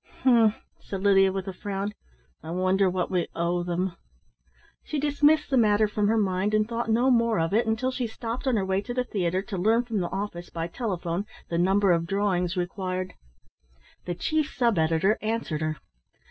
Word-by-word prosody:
"H'm!" 230 -4 +5 0.2
said 195 -1 -6
Lydia 195 -1 +5
with 190 0 -4
a 190 - -4
frown. 200 +2 -4 0.5
"I 160 - -9
wonder 185 +2 +2
what 180 0 -2
we 180 -2 0
owe 170 +1 0
them!" 175 +1 -2 0.9
She 305 - -3
dismissed 295 +1 +2
the 265 - +3
matter 215 -2 +4
from 210 0 0
her 225 +2 +2
mind, 200 0 +1
and 215 0 +2
thought 235 0 -3
no 240 +4 +3
more 230 -4 +3
of 165 +3 0
it 225 +2 +2
until 235 +4 0
she 255 -2 -2
stopped 230 +3 -5
on 255 - +3
her 200 -3 0
way 190 +1 0
to 245 +3 -6
the 250 - +1
theatre 185 -5 -1
to 195 -3 -5
learn 225 +6 +3
from 230 -4 -2
the 175 -2 -2
office 190 -3 -5
by 165 -1 -4
telephone 180 -1 -3 0.2
the 170 - -1
number 195 +2 +3
of 170 -1 +1
drawings 185 -2 0
required. 185 0 -3 0.9
The 175 - -3
chief 310 - -1
sub 235 -7 +1
editor 165 +6 +2
answered 215 -8 -2
her. 155 0 -2
200 Hz, 190 wpm, -26 LUFS, 180-225 Hz, 0.9 s, H'm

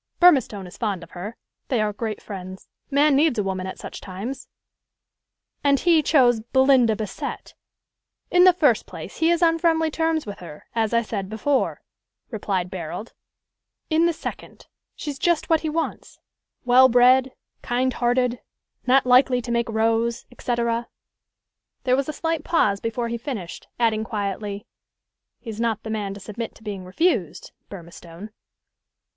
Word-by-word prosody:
Burmistone 265 - +4
is 180 - -12
fond 200 -6 -2
of 170 - -14
her. 200 +6 -7 0.3
They 250 - 0
are 210 -1 0
great 215 0 -5
friends. 185 -2 -8 0.2
Man 285 +1 +4
needs 290 -3 +3
a 210 - +1
woman 190 -1 -3
at 190 - -7
such - - -8
times." 205 +8 -6 1.2
"And 280 -1 +3
he 335 -3 +4
chose 250 -6 +4
Belinda 255 -1 +3
Bassett?" 210 -2 -6 0.8
"In 360 0 +6
the 370 - +9
first 295 -10 +2
place, - - -9
he 325 - +2
is 345 0 +2
on 330 0 +3
friendly 325 -1 +2
terms 320 0 0
with 205 -1 -7
her, 160 -4 -11
as 225 -2 0
I 235 0 +2
said 200 -4 -4
before," 260 +6 -1 0.5
replied 195 -5 -2
Barold; 185 +5 -6 0.8
"in 325 +2 +4
the - - +2
second, 320 - -8 0.3
she's 285 -3 -6
just 345 0 +1
what 320 - +5
he 315 - -3
wants 325 +2 -4 0.5
well 255 +1 +7
bred, 255 +2 +4 0.3
kind 255 +1 0
hearted, 245 0 +1 0.5
not 260 +1 +4
likely 250 0 +5
to 240 - -5
make 235 -1 0
rows, 225 +1 0
et 245 - -19
caetera." 235 -1 -1 1.0
There 255 -1 +3
was 275 +2 -1
a - - -3
slight 325 0 -2
pause 205 -12 +2
before 230 +2 -3
he 235 0 -3
finished, 220 -9 -6
adding 220 -2 +2
quietly, 205 -1 -4 0.8
"He's 225 -2 -6
not 225 -2 -1
the 220 - -5
man 205 -3 -3
to - - -9
submit 215 +3 -6
to - - -18
being 200 -4 -6
refused 205 - -1 0.2
Burmistone." 170 +2 -10
235 Hz, 160 wpm, -23 LUFS, 205-275 Hz, 1.2 s, the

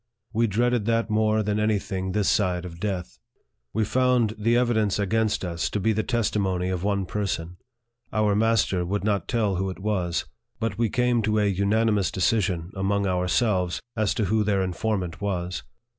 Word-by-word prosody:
We 115 +1 +2
dreaded 120 +1 +1
that 115 -1 +1
more 110 0 +2
than 105 0 0
any 105 0 +2
thing 95 -1 -4
this 105 -1 +1
side 90 -3 +1
of 85 -1 -9
death. 95 -3 -4 0.5
We 110 +1 0
found 125 -2 +2
the 115 +3 +2
evidence 110 -5 +2
against 105 0 0
us 85 -2 -2
to 105 - -2
be 110 +3 +2
the 110 - +1
testimony 100 -6 0
of 90 -1 -2
one 100 -1 0
person; 90 -3 -3 0.5
our 105 -1 +2
master 110 -4 +2
would 100 +4 -2
not 100 -4 0
tell 105 -6 0
who 95 +1 -1
it 95 - -6
was; 95 -4 -1 0.3
but 110 -3 -1
we 115 -2 +2
came 125 +1 +2
to 105 0 +1
a 105 - +3
unanimous 100 +1 +2
decision 95 -3 0
among 100 +1 0
ourselves 90 0 +1 0.2
as 110 -3 +1
to 110 - +1
who 110 +2 +2
their 100 -2 +1
informant 95 -1 -2
was. 90 -3 -2
105 Hz, 175 wpm, -25 LUFS, 95-110 Hz, 0.5 s, a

